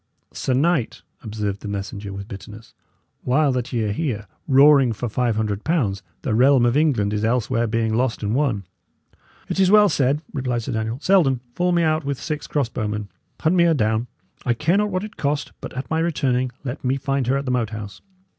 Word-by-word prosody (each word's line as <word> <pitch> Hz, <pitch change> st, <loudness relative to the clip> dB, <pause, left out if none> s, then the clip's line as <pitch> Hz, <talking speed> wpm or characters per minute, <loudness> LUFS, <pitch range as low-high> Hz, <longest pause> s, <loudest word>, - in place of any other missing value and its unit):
"Sir 130 Hz, -, -1 dB
knight," 150 Hz, -3 st, +1 dB, 0.2 s
observed 105 Hz, -2 st, -4 dB
the -, -, -6 dB
messenger, 100 Hz, 0 st, -5 dB
with 100 Hz, 0 st, -7 dB
bitterness, 105 Hz, +1 st, -10 dB, 0.5 s
"while 140 Hz, +3 st, +2 dB
that 125 Hz, -1 st, -2 dB
ye 115 Hz, -3 st, 0 dB
are 105 Hz, -, -1 dB
here, 110 Hz, -4 st, -2 dB, 0.2 s
roaring 135 Hz, -3 st, +6 dB
for 120 Hz, +3 st, -4 dB
five 120 Hz, 0 st, 0 dB
hundred 105 Hz, -1 st, -2 dB
pounds, 120 Hz, -, 0 dB, 0.2 s
the 125 Hz, -, -1 dB
realm 125 Hz, +2 st, +5 dB
of 120 Hz, +1 st, +2 dB
England 130 Hz, -10 st, +2 dB
is 105 Hz, 0 st, -1 dB
elsewhere 120 Hz, +1 st, +1 dB
being 115 Hz, 0 st, 0 dB
lost 120 Hz, 0 st, 0 dB
and 105 Hz, +1 st, 0 dB
won." 125 Hz, -7 st, 0 dB, 0.8 s
"It -, -, -3 dB
is 190 Hz, -1 st, +4 dB
well 210 Hz, 0 st, +6 dB
said," 145 Hz, 0 st, +1 dB
replied 125 Hz, -4 st, -2 dB
Sir 130 Hz, -, -4 dB
Daniel. 110 Hz, +1 st, -2 dB
"Selden, 160 Hz, -10 st, +3 dB
fall 180 Hz, +4 st, +1 dB
me 170 Hz, -1 st, +2 dB
out 155 Hz, 0 st, +1 dB
with 140 Hz, -1 st, -3 dB
six 150 Hz, -2 st, -4 dB
cross 145 Hz, -5 st, 0 dB
bowmen; 105 Hz, -3 st, -4 dB, 0.3 s
hunt 160 Hz, +3 st, +2 dB
me 170 Hz, -1 st, +5 dB
her 165 Hz, -1 st, +4 dB
down. 110 Hz, -1 st, 0 dB, 0.4 s
I 120 Hz, -, +1 dB
care 160 Hz, +9 st, +2 dB
not 210 Hz, 0 st, +1 dB
what 185 Hz, 0 st, -2 dB
it 215 Hz, 0 st, -9 dB
cost; 145 Hz, 0 st, -1 dB
but, -, -, -6 dB
at 130 Hz, +4 st, -6 dB
my 160 Hz, -, +1 dB
returning, 130 Hz, -6 st, 0 dB
let 130 Hz, +1 st, -5 dB
me 130 Hz, +1 st, +1 dB
find 135 Hz, -2 st, -1 dB
her 135 Hz, +2 st, +2 dB
at 140 Hz, -, -3 dB
the 125 Hz, -, -1 dB
Moat 120 Hz, -4 st, 0 dB
House. 105 Hz, -2 st, -8 dB
125 Hz, 210 wpm, -22 LUFS, 110-150 Hz, 0.8 s, roaring